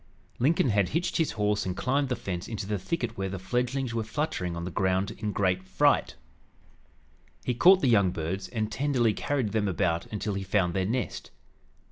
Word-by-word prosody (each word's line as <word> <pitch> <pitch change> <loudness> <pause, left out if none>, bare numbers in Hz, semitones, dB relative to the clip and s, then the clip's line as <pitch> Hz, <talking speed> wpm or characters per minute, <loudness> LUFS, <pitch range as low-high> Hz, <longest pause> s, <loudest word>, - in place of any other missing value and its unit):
Lincoln 140 +1 +3
had 100 -4 +2
hitched 175 - -1
his 160 - +1
horse 105 -1 0
and 90 -1 -3
climbed 135 +1 +1
the 125 - 0
fence 90 -6 -5
into 110 -3 -4
the 105 0 -2
thicket 120 - -3
where 95 0 -1
the 95 - -4
fledglings 125 +5 -1
were 115 -1 -1
fluttering 110 - -2
on 85 0 -4
the 90 - -4
ground 95 +2 +1
in 105 -1 -4
great 95 -2 +1
fright. 95 0 +2 1.3
He 125 - +1
caught 185 +10 +6
the 135 - +2
young 100 -6 +4
birds 90 +3 -3
and 110 -2 -3
tenderly 130 -5 +1
carried 130 -2 -1
them 105 -1 +1
about 85 -3 0
until 105 -1 -3
he 100 - -3
found 95 -2 +1
their 95 0 0
nest. 120 0 -3
105 Hz, 190 wpm, -28 LUFS, 95-125 Hz, 1.3 s, caught